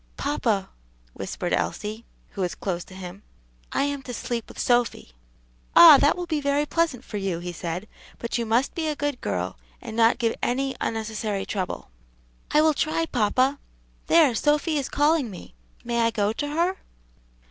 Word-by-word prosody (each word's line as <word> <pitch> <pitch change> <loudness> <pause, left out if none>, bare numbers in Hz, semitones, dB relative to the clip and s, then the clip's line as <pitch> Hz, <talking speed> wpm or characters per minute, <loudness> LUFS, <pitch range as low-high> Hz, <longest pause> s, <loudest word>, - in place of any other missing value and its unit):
"Papa," 225 -9 -1 0.4
whispered - - -4
Elsie, 215 +2 -2 0.3
who 200 - -5
was 180 -1 -1
close 175 -3 -3
to 185 - -13
him, 185 +1 -8 0.5
"I - - +1
am 285 -1 -2
to 250 -2 -7
sleep 235 -1 -3
with - - -13
Sophy." 240 - +1 0.6
"Ah! 320 -5 +11
that 290 - +3
will 355 - -3
be 315 -3 -1
very 280 +1 +1
pleasant 305 -6 0
for 210 - -5
you," 195 -4 -2
he 175 +1 -5
said, 175 +3 -5 0.3
"but 235 - -4
you 235 - 0
must 235 +5 +2
be 325 -2 -2
a 305 - -1
good 290 -3 -2
girl, - - -3 0.2
and 225 -3 -8
not 230 0 +4
give 230 -3 +1
any 270 +2 0
unnecessary 215 -2 -2
trouble." 185 - -4 0.6
"I 300 - +4
will 315 0 +4
try, 315 +3 0
papa. 255 +2 +1 0.5
There, 320 -6 +5
Sophy 300 +5 +1
is 275 -2 -2
calling 295 -3 +2
me; 185 - -11 0.3
may 235 -1 0
I 230 - +3
go 210 -2 0
to 290 +6 -3
her?" 340 +6 0
245 Hz, 175 wpm, -25 LUFS, 210-290 Hz, 0.6 s, Ah